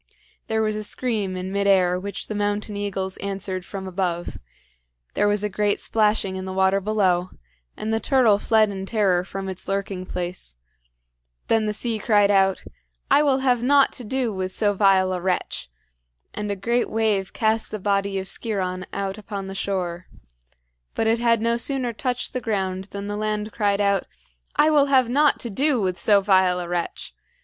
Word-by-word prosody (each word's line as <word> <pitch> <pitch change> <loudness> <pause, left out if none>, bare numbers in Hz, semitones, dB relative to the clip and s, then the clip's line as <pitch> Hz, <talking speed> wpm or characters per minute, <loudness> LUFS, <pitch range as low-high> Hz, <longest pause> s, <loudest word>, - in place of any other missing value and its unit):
There 220 0 +1
was 215 -1 0
a 215 - -4
scream 210 -5 -2
in 185 +1 -4
mid 200 0 0
air 180 -2 +4
which 200 +2 -5
the - - -5
mountain 205 0 -2
eagles 195 -2 -3
answered 195 -1 -4
from 190 +1 -7
above; 180 -2 -3 0.7
there 205 - +2
was 205 0 +1
a - - +1
great 205 +1 0
splashing 210 -3 +1
in 190 0 -5
the 190 - -5
water 190 +1 +2
below, 185 -3 +1 0.5
and 220 +1 -2
the 225 - +1
turtle 235 -6 +3
fled 215 -1 +3
in 190 -1 -5
terror 195 -5 +2
from 195 +1 -6
its 190 -1 -7
lurking 195 -1 -3
place. 175 - -5 0.9
Then 220 -1 +3
the - - +1
sea 225 0 -2
cried 205 -1 +3
out: 195 -1 +3 0.5
"I 290 - +6
will 275 -3 +2
have 250 -3 +2
naught 275 +2 +4
to 250 - -6
do 245 0 -1
with 185 -1 -4
so 205 -2 +2
vile 190 -2 +3
a 180 - -3
wretch!" 180 - -2 0.6
and 210 0 -4
a 200 - -1
great 235 +5 0
wave 215 -3 0
cast 220 0 0
the 215 - -4
body 200 0 0
of 190 - -3
Sciron 185 -4 -3
out 195 +1 -3
upon 200 -2 -6
the 190 - -6
shore. 180 -3 -3 0.9
But - - 0
it 225 +1 +2
had 230 -2 +2
no 235 0 +2
sooner 250 -1 -1
touched 250 +2 -3
the 255 - -2
ground 190 -4 -2
than 200 0 -7
the 205 0 -3
land 215 0 -2
cried 205 -2 +1
out: 200 -2 +1 0.5
"I 310 - +4
will 290 -2 +4
have 260 -3 +4
naught 290 +3 +3
to 235 - -5
do 270 +5 +2
with 185 -3 -1
so 200 +2 +4
vile 190 -2 +3
a 175 - -4
wretch!" 175 - -4
200 Hz, 190 wpm, -23 LUFS, 190-220 Hz, 0.9 s, I